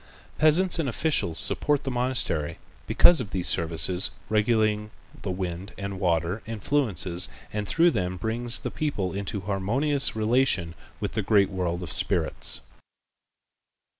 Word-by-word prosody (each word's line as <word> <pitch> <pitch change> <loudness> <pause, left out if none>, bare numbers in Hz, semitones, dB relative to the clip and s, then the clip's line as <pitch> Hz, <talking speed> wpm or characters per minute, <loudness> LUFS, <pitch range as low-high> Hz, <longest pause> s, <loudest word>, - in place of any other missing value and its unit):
Peasants 170 +4 +4
and 145 -5 0
officials 115 - 0
support 145 -1 +3
the 135 - -3
monastery 120 - -1 0.3
because 175 -3 +6
of 120 -5 -4
these 95 -3 -2
services 85 +2 0 0.2
regulating 110 -1 +1 0.3
the 100 - -5
wind 90 +1 -5
and 100 -1 -5
water 85 +3 0
influences 110 -6 0 0.2
and 105 -1 -3
through 170 - +4
them 90 - -2
bringing 115 +6 -4
the - - -3
people 105 -12 -2
into 100 +1 -4
harmonious 115 +10 0
relation 110 -6 +1 0.3
with - - -3
the 110 - -2
great 100 -1 +2
world 90 -1 -3
of - - -6
spirits. - - 0
105 Hz, 135 wpm, -26 LUFS, 90-130 Hz, 0.3 s, because